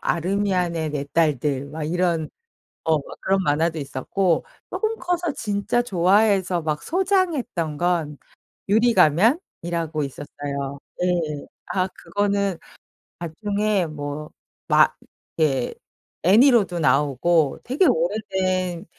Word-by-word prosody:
아르미안의 180 -3 0
4 145 -1 -3
딸들 145 -4 +1
막 155 0 -6
이런 170 0 0 0.5
어 160 -2 +2 0.2
그런 195 0 +1
만화도 160 +2 +1
있었고 165 +6 -1 0.2
쪼금 445 0 -2
커서 350 -2 -1
진짜 210 +3 0
좋아해서 190 -3 +2
막 150 -1 -2
소장했던 335 - 0
건 165 -5 0 0.5
유리가면이라고 175 - +2
있었어요. 140 0 -5 0.2
예. 165 -5 -1 0.2
아 185 -1 0
그거는 200 +1 -1 0.6
나중에 200 +3 -1
뭐 150 0 -6 0.4
막 - - +4 0.4
이렇게 135 -6 +1 0.5
애니로도 205 -3 +5
나오고 145 +2 +2
되게 275 +9 +2
오래된 185 - 0
175 Hz, 225 characters per minute, -23 LUFS, 155-205 Hz, 0.6 s, 애니로도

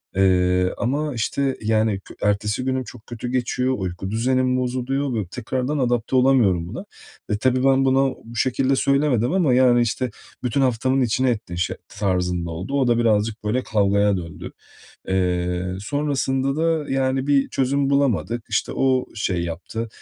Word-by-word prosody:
Eee, 90 -1 +3
ama, 145 +5 -1
işte, 130 +4 -1
yani, 110 -2 +1
kü - - -14
ertesi 105 +4 0
günüm 130 0 0
çok 120 -1 -13
kötü 120 0 -6
geçiyor, 125 +1 0
uyku 95 +1 -4
düzenim 130 +2 +1
bozuluyor 130 +2 -1
ve 110 -4 -1
tekrardan 130 +6 -2
adapte 120 -2 0
olamıyorum 120 -10 +3
buna. 120 - -7 0.4
E, 105 - 0
tabii 130 +2 +1
ben 135 0 +4
buna, 135 0 +2
bu 115 +1 -11
şekilde 130 +3 +1
söylemedim 140 -3 +2
ama, 170 -9 +3
yani, 125 -1 +5
işte, 120 +2 -1 0.3
bütün 125 +3 0
haftamın 130 +1 +1
içine 125 +2 +1
ettin, 105 -7 -3
şe 90 0 -2
tarzında 90 -3 -1
oldu. 90 +11 -6
O 125 - +2
da 120 - +3
birazcık, 110 -1 +1
böyle, 120 +5 0
kavgaya 100 -1 +2
döndü. 85 -2 -7 0.6
Eee, 90 -1 -1
sonrasında 135 +2 -1
da, 160 -2 0
yani, 135 0 0
bir 140 -1 +3
çözüm 135 +1 0
bulamadık. 120 -4 +1
İşte, - - -1
o 130 -1 +2
şey 95 -5 -1
yaptı, 95 +7 -5
120 Hz, 155 wpm, -22 LUFS, 105-130 Hz, 0.6 s, yani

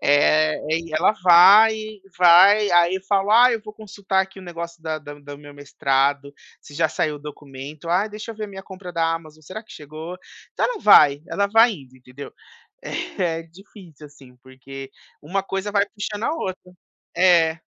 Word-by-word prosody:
Eh, 155 +2 +2 0.2
e 165 0 -3
ela 165 +6 +3
vai, 200 +6 +7 0.4
vai, 190 +4 +5
aí 175 +2 +2
falo: 200 +1 +1
"Ah, 245 +2 +6
eu 225 - -3
vou 215 - -10
consultar 200 -2 -3
aqui 190 0 -12
o - - -11
negócio 170 -1 -8
da 160 -1 -4
da 145 0 -11
do 145 0 -12
meu 145 0 -14
mestrado, 140 0 -2 0.3
se - - -16
já 160 +3 0
saiu 150 -1 -3
o - - -12
documento", 145 +1 -11
"Ah, 185 +5 +1
deixa 215 +1 -9
eu 225 - -10
ver 215 - -5
a - - -7
minha 190 -1 -10
compra 185 -2 -11
da 165 0 0
Amazon, 155 -1 -9
será 200 +9 -10
que - - -16
chegou?". 155 +4 -10 0.4
Então - - -1
ela - - -5
vai, 145 -8 +5
ela 200 0 -1
vai 225 +3 +4
indo, 135 -8 -13
entendeu? 125 +2 -12 0.9
É, 165 -3 -2
difícil, 165 -3 -16
assim, 135 -3 -19
porque 135 +1 -12 0.3
uma 190 +6 -3
coisa 195 +1 -5
vai 200 -1 +2
puxando 210 0 -7
a 300 - -1
outra. 185 - -7 0.4
É, 170 -2 +3
170 Hz, 185 wpm, -21 LUFS, 145-195 Hz, 0.9 s, vai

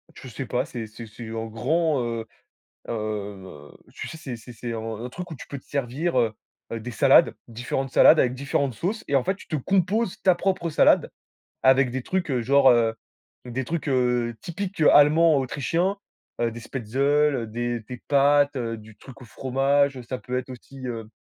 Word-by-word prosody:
je - - -11
sais 130 +3 -6
pas, 125 - 0
c'est 115 -3 -6
c'est 115 +2 -10
c'est 110 +1 -9
en 115 0 -3
grand, 145 +6 0
heu, 115 -1 -3 0.6
heu, - - -1
heu, 100 -8 -6 0.2
tu - - -6
sais, - - -8
c'est 135 -6 -6
c'est 120 +2 -12
c'est 120 +1 -5
un 115 - -4 0.2
un - - -5
truc 175 +6 -7
où - - -5
tu - - -10
peux 140 - -6
te - - -29
servir, 140 +4 -2
heu, 115 -2 +1 0.4
des 115 +1 -5
salades, 110 - +5
différentes 120 +3 -3
salades 155 - +7
avec 125 -1 +2
différentes 140 -1 -1
sauces 200 - -3
et 140 - +2
en 135 - +3
fait, 190 - 0
tu - - -15
te 160 - -2
composes 190 - 0
ta 185 -2 +5
propre 185 -1 -1
salade 150 - +4 0.5
avec 130 -1 +5
des 130 0 -3
trucs, 185 -2 -2
heu, 125 -2 0
genre, 135 +2 +5
heu, 115 -2 +2 0.5
des 125 +1 -4
trucs, 160 +1 -3
heu, 125 -2 +1
typiques 190 +2 -5
allemands, 155 +2 +6
autrichiens, 165 +9 -1 0.4
heu, 115 -1 +1
des 115 - -8
spätzles, 135 +1 0
des 120 +1 -2
des 125 +3 -8
pâtes, 145 0 +4
heu, 115 -2 -3
du 110 0 -14
truc 135 0 -14
au - - -10
fromage, 135 +3 +1
heu, 125 - -8
ça 130 +2 -5
peut 125 0 -3
être 130 - -5
aussi, 130 +1 -9
heu, 115 -3 -5
130 Hz, 200 wpm, -25 LUFS, 115-145 Hz, 0.6 s, salades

